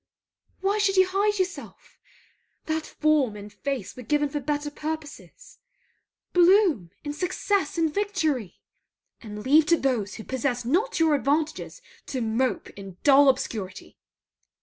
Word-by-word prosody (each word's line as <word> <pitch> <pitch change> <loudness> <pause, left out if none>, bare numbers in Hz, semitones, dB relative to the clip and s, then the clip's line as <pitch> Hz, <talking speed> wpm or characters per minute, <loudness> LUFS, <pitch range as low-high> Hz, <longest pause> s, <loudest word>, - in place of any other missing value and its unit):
Why 400 +2 +1
should 395 -1 +2
you 375 - +7
hide 410 +2 +1
yourself? 375 0 -5 0.7
That 315 0 -2
form 300 -8 +1
and 205 0 -10
face 255 -1 -4
were 255 - -9
given 295 +4 0
for 295 - -3
better 295 +1 -2
purposes. 310 +10 -8 0.7
Bloom 355 - +4
in 290 -1 -4
success 360 +1 -1
and 325 -2 +1
victory! 315 - -1 0.7
And 210 -1 -8
leave 300 +3 +5
to 335 - +4
those 235 -9 -1
who 220 - -8
possess 245 -1 -2
not 375 - 0
your 320 -2 +4
advantages 305 - -1 0.2
to 260 - -3
mope 230 0 -1
in 195 -2 -11
dull 280 -1 +7
obscurity! 220 -8 -3
295 Hz, 135 wpm, -25 LUFS, 245-345 Hz, 0.7 s, you